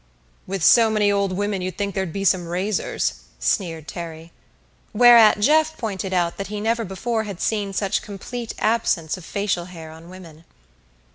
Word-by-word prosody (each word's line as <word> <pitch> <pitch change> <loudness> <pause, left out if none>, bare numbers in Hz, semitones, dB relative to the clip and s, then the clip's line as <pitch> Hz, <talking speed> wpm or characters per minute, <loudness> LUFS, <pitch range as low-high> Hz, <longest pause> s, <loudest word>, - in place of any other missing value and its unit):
"With 190 -2 -3
so 230 +3 +6
many 210 -2 +2
old 200 -1 0
women 200 0 -2
you'd 185 -1 -5
think 200 -1 -2
there'd 190 -3 -2
be 195 +3 -4
some 180 -2 +2
razors," 180 - -2 0.2
sneered 160 - -1
Terry. 165 -1 -8 0.6
Whereat 230 -2 +7
Jeff 315 +7 +3
pointed 195 -4 -4
out 175 -2 0
that 195 - -4
he 210 0 -5
never 230 +2 0
before 220 +3 -3
had 200 -4 -7
seen 205 -3 -1
such 195 0 -1
complete 225 +4 -7
absence 215 -8 0
of 185 - -11
facial 195 -1 -2
hair 165 -3 -10
on 160 +2 -13
women. 170 -4 -13
195 Hz, 165 wpm, -22 LUFS, 175-215 Hz, 0.6 s, Whereat